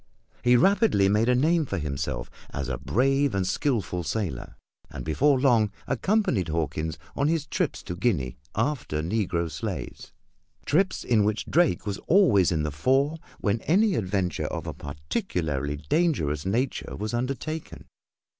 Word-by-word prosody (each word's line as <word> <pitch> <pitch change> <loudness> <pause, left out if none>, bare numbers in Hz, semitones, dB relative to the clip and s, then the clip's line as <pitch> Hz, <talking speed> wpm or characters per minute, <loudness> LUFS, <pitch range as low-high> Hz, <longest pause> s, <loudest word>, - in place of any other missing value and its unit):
He 125 0 +5
rapidly 190 - +4
made 110 +4 +2
a 125 - +4
name 160 +6 +3
for 100 - -2
himself 70 -6 -3 0.2
as 70 -1 -4
a 60 - -3
brave 135 0 +1
and 95 -1 +1
skilful 100 -5 -1
sailor, 85 - -3 0.3
and - - -7
before 135 - +3
long 120 -6 +4 0.2
accompanied 190 - +1
Hawkins 80 0 -2 0.2
on 140 - +1
his 160 -2 0
trips - - -2
to 90 - -5
Guinea 90 - 0 0.2
after 115 - -1
negro 90 -2 0
slaves - - -5 0.5
trips 190 +6 +1
in 115 -4 +3
which 105 +1 0
Drake 170 -6 +2
was 100 -2 -3
always 160 - +5
in 80 -3 0
the 75 - -2
fore 135 - +1 0.2
when 105 +2 0
any 200 +5 +3
adventure 95 - -1
of - - -5
a - - -4
particularly 75 0 -3
dangerous 130 - +1
nature 125 +7 -1
was 105 +2 -4
undertaken. 135 +6 -4
110 Hz, 145 wpm, -26 LUFS, -, 0.5 s, He